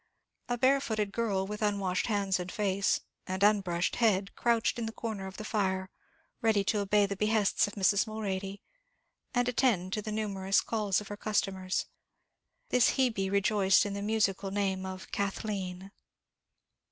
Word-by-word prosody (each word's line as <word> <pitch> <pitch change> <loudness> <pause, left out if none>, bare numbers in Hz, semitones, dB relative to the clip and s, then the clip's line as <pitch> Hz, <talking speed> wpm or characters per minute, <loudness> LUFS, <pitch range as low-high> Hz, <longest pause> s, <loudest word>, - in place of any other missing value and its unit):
A 245 - 0
barefooted 235 -6 +1
girl, 205 -4 0
with 210 +2 -6
unwashed 200 -3 0
hands 200 -4 +1
and 180 0 -5
face, 200 -3 +1 0.3
and 190 +1 -2
unbrushed 190 -4 +2
head, 200 -4 +2
crouched 235 +1 +1
in 225 - -2
the - - -4
corner 220 -4 -5
of 190 - -9
the 215 - -6
fire, 190 -3 -1 0.5
ready 220 -4 +3
to 210 +2 0
obey 205 +1 +3
the 200 0 -3
behests 210 0 +2
of 205 - -8
Mrs. 200 +2 +3
Mulready, 200 -2 -4 0.7
and 245 0 +2
attend 220 -7 +1
to 210 - -1
the 215 - -5
numerous 200 -3 +1
calls 210 -3 0
of 205 - -10
her 205 - -6
customers. 195 -3 -1 0.8
This 250 -1 +4
Hebe 220 -7 +1
rejoiced 200 0 +3
in 205 - -3
the 200 - -4
musical 200 -2 0
name 190 -1 -1
of 185 0 -8
Kathleen. 195 -2 -3
200 Hz, 155 wpm, -30 LUFS, 190-215 Hz, 0.8 s, This